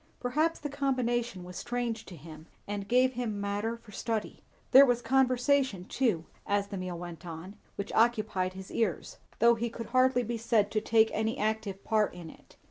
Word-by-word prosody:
Perhaps 305 +7 +1
the 295 - -3
combination 240 -7 -1
was 180 0 -9
strange 240 -2 -3
to 185 - -9
him 160 +1 -12 0.2
and 205 -1 -4
gave 255 +2 +3
him 235 -4 -3
matter 205 +3 -2
for 230 -2 -17
study. 220 +1 -3 0.3
There 270 - +10
was 245 -3 +3
conversation 260 -5 +2
too, 210 -9 0 0.2
as 200 0 0
the 200 - -5
meal 185 -1 -4
went 175 0 -8
on, 175 +3 -8 0.2
which 200 - -5
occupied 215 -5 +2
his 190 0 -9
ears, 215 -7 -2 0.2
though 235 +1 +6
he 235 +1 -2
could 230 0 -7
hardly 255 -1 +4
be 235 0 -3
said 225 -3 +2
to 215 - 0
take 220 0 +3
an 220 +1 0
active 215 -2 -2
part 215 -4 +1
in 170 -2 -9
it. - - -20
220 Hz, 185 wpm, -30 LUFS, 195-245 Hz, 0.3 s, There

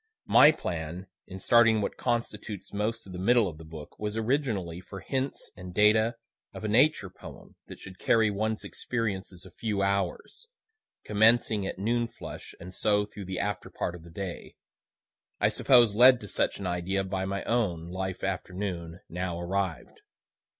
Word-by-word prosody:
My 150 - +8
plan 85 - -5 0.2
in 95 0 -8
starting 115 +2 +5
what 100 - -2
constitutes 115 -4 -3
most 110 +3 -2
of 95 - -10
the 90 - -6
middle 115 +2 +4
of 80 -3 -7
the - - -10
book, 80 -1 -11
was 105 +1 -3
originally 110 - -1
for 95 +1 -9
hints 135 +4 -3
and 90 -1 -9
data 110 +2 +4 0.4
of - - -7
a - - -1
Nature 115 -3 +3
poem - - -13
that - - -10
should 95 -1 -11
carry 110 -2 +3
one's 110 +2 -2
experiences 95 -6 -3
a 95 - -13
few 105 +1 -2
hours, 100 - -2 0.6
commencing 110 -1 +3
at - - -5
noon 115 +4 0
flush, 115 - -10
and 90 +2 -10
so 105 +1 +2
through 105 -1 -9
the 95 0 -4
after 105 -2 -3
part 85 - -3
of 90 - -10
the 85 - -13
day 90 +1 -7 0.8
I - - +4
suppose 120 -5 +5
led 125 +3 +7
to 105 - -8
such - - 0
idea 95 +1 -1
by 95 0 -2
my 100 +1 -3
own 90 -9 0
life 95 0 -4
afternoon 90 -3 -4
now 90 0 -3
arrived. 90 -1 -3
100 Hz, 165 wpm, -28 LUFS, 90-110 Hz, 0.8 s, My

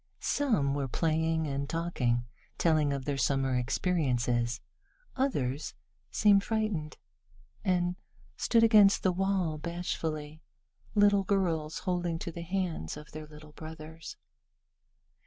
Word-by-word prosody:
Some 215 - +1
were 140 -1 -1
playing 160 +3 +1
and 140 -1 -3
talking, 125 -8 0 0.3
telling 155 -3 +3
of 135 -2 -3
their 140 -2 -1
summer 135 -2 +1
experiences. 125 -4 0 0.6
Others 145 - -1 0.3
seemed 200 -2 +4
frightened, 215 -9 -2 0.7
and 180 -2 +1 0.4
stood 230 -1 +3
against 210 -3 +6
the 185 - +4
wall 185 -4 0
bashfully, 160 -2 -4 0.5
little 205 -1 +5
girls 170 -6 0
holding 175 -3 -1
to 170 - -5
the 170 - -7
hands 170 - -3
of 150 0 -11
their 155 0 -8
little 150 0 -13
brothers. 160 +1 -9
160 Hz, 115 wpm, -30 LUFS, 145-185 Hz, 0.7 s, against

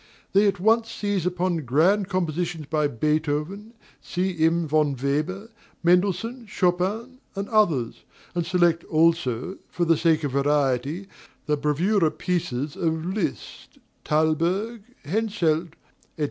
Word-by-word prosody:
They 200 +2 +5
at 200 -2 0
once 225 +3 +3
seize 205 -5 -1
upon 180 -1 0
grand 165 - +2
compositions 175 -3 -2
by 150 0 +1
Beethoven, 155 - -2 0.3
C.M. 170 -2 0
von 150 -2 +2
Weber, 155 - -2 0.3
Mendelssohn, 195 +7 +1
Chopin, 200 +8 -1 0.2
and 200 +1 -3
others, 170 - +1 0.3
and 175 - 0
select 175 -1 +2
also, 165 - +1
for 175 - -1
the 165 0 +4
sake 160 -1 +2
of 145 - -1
variety, 140 +4 +1 0.4
the 150 - +1
bravoura 160 +5 +2
pieces 150 -6 -2
of 160 -1 -1
Liszt, 190 +1 -4 0.3
Thalberg, 170 +9 0 0.2
Henselt, 170 -4 0 0.4
&c. - - -18
170 Hz, 120 wpm, -24 LUFS, 155-195 Hz, 0.4 s, They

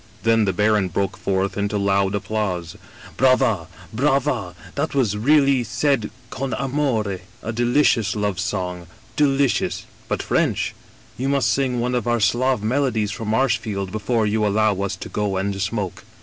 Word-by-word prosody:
Then 115 -1 +3
the 95 - +1
baron 105 +1 +2
broke 95 +2 -1
forth 95 0 -1
into 100 +1 0
loud 100 0 +1
applause. 95 -5 -2 0.2
* - - -17
Brava, 130 -9 +3 0.3
brava! 130 -7 0 0.2
that 155 - -2
was 115 -7 +2
really 135 +2 +4
said 120 0 0 0.2
con 130 -3 -3
amore. 125 -8 -1 0.2
A 115 - -3
deli 120 +5 +2
cious 115 -7 +2
love 105 -3 -1
song, 90 -1 -3 0.3
delicious 140 -3 +1
— - - -27
^biit - - -1
French! - - 0 0.5
You 135 +2 0
must 140 -1 +2
sing 130 -3 0
one 125 +1 -1
of 120 -2 -1
our 120 0 +2
Slav 125 +2 +2
melodies 115 -3 0
for 110 - -5
Marshfield 110 -4 0
before 110 +1 0
you 105 +1 +1
allow 105 -1 +2
us 100 0 -1
to - - -8
go 105 -2 -1
and 100 +1 -2
smoke.' 100 -1 -3
110 Hz, 165 wpm, -22 LUFS, 100-130 Hz, 0.5 s, really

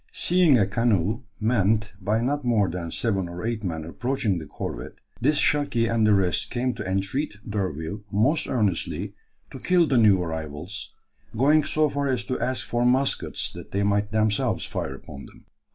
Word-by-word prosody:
Seeing 175 -6 +3
a 100 - +4
canoe 110 +2 0
manned 110 -1 +1
by 105 +4 +1
not 145 +4 -1
more 115 -5 +2
than 85 -1 -4
seven 95 -1 -1
or 90 +3 -6
eight 115 -2 -2
men 80 -4 -3
approaching 110 0 -1
the 80 - -9
corvette, - - -6 0.3
this 145 +5 +3
"Shaki" 145 -7 +2
and 115 -1 +2
the 105 - +5
rest 95 +2 0
came 125 0 -1
to 95 - -5
entreat 100 +8 -1
D'Urville 95 -2 -3
most 130 +11 +2
earnestly 105 -9 -1 0.4
to - - -8
kill 180 -2 +3
the 135 -5 +2
new 105 -4 +5
arrivals, 80 +4 -5 0.4
going 150 +5 +4
so 155 +1 +2
far 140 0 -2
as 125 -3 0
to 130 - -2
ask 130 0 -1
for 120 0 0
muskets 130 +2 +1
that - - -10
they 100 +1 +1
might 100 +1 +1
themselves 110 -1 +1
fire 65 - -4
upon 70 0 -11
them. - - -19
110 Hz, 175 wpm, -25 LUFS, 95-130 Hz, 0.4 s, the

